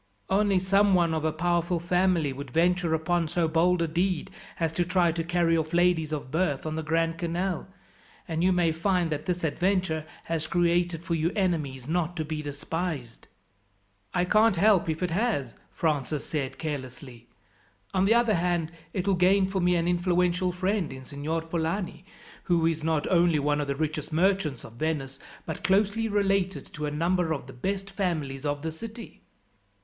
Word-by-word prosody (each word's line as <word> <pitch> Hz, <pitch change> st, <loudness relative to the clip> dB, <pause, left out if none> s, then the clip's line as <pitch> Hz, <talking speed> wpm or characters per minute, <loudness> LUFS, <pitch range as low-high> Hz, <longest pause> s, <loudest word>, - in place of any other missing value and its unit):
Only 200 Hz, 0 st, +3 dB
someone 190 Hz, -2 st, +3 dB
of 160 Hz, -1 st, -1 dB
a 160 Hz, -, +2 dB
powerful 175 Hz, +1 st, 0 dB
family 175 Hz, -4 st, +1 dB
would 140 Hz, +1 st, -7 dB
venture 170 Hz, +3 st, +2 dB
upon 165 Hz, +1 st, 0 dB
so 165 Hz, +1 st, +1 dB
bold 170 Hz, +2 st, +2 dB
a -, -, 0 dB
deed, 175 Hz, +1 st, -1 dB, 0.3 s
as 165 Hz, -2 st, +1 dB
to 175 Hz, +2 st, 0 dB
try 175 Hz, -1 st, +2 dB
to 165 Hz, 0 st, -2 dB
carry 170 Hz, -1 st, +2 dB
off 160 Hz, 0 st, -1 dB
ladies 175 Hz, -3 st, +3 dB
of 145 Hz, -4 st, -4 dB
birth 160 Hz, -4 st, 0 dB
on 155 Hz, -, -2 dB
the 160 Hz, -, -2 dB
Grand 165 Hz, +1 st, 0 dB
Canal, 175 Hz, +1 st, -2 dB, 0.6 s
and 165 Hz, -1 st, -1 dB
you 185 Hz, -, +4 dB
may 175 Hz, -2 st, +3 dB
find 175 Hz, 0 st, 0 dB
that 150 Hz, +1 st, -3 dB
this 180 Hz, -1 st, -1 dB
adventure 175 Hz, 0 st, 0 dB, 0.2 s
has 160 Hz, -1 st, -3 dB
created 175 Hz, -1 st, +1 dB
for 170 Hz, -, -2 dB
you 165 Hz, +1 st, +1 dB
enemies 150 Hz, -, -1 dB
not 175 Hz, +1 st, -1 dB
to 155 Hz, -, -1 dB
be 155 Hz, 0 st, -3 dB
despised." 145 Hz, -3 st, -5 dB, 0.8 s
"I 175 Hz, -, +1 dB
can't 215 Hz, +2 st, +4 dB
help 190 Hz, -1 st, +4 dB
it -, -, +2 dB
if 165 Hz, -, -6 dB
it 180 Hz, -, -1 dB
has," 175 Hz, -, 0 dB, 0.2 s
Francis 150 Hz, -2 st, -1 dB
said 140 Hz, -4 st, -3 dB
carelessly. 130 Hz, -5 st, -6 dB, 0.7 s
"On 190 Hz, 0 st, +3 dB
the 220 Hz, +4 st, +4 dB
other 235 Hz, -2 st, +3 dB
hand, 175 Hz, -2 st, 0 dB, 0.2 s
it 185 Hz, 0 st, -2 dB
will 195 Hz, -, +4 dB
gain 190 Hz, +2 st, +4 dB
for 190 Hz, 0 st, -2 dB
me 180 Hz, 0 st, +3 dB
an 170 Hz, 0 st, +1 dB
influential 180 Hz, +1 st, +1 dB
friend 185 Hz, -1 st, -1 dB
in 130 Hz, 0 st, -9 dB
Signor 150 Hz, +4 st, -3 dB
Polani, 165 Hz, +1 st, -3 dB, 0.4 s
who 170 Hz, -3 st, +2 dB
is 160 Hz, -1 st, 0 dB
not 160 Hz, -2 st, +1 dB
only 170 Hz, -3 st, +4 dB
one 145 Hz, +1 st, +1 dB
of 145 Hz, -, -3 dB
the 140 Hz, -, -1 dB
richest 155 Hz, +1 st, -3 dB
merchants 170 Hz, -5 st, +1 dB
of 115 Hz, -, -11 dB
Venice, 145 Hz, -4 st, -2 dB, 0.3 s
but -, -, -6 dB
closely 205 Hz, +3 st, +2 dB
related 195 Hz, -2 st, 0 dB
to 150 Hz, -1 st, -3 dB
a -, -, -1 dB
number 170 Hz, +3 st, 0 dB
of 140 Hz, -5 st, -5 dB
the 135 Hz, -, -11 dB
best 195 Hz, +8 st, -3 dB
families 155 Hz, -8 st, -2 dB
of 145 Hz, 0 st, -2 dB
the 160 Hz, -, -2 dB
city." 225 Hz, +7 st, -9 dB
170 Hz, 185 wpm, -27 LUFS, 155-180 Hz, 0.8 s, you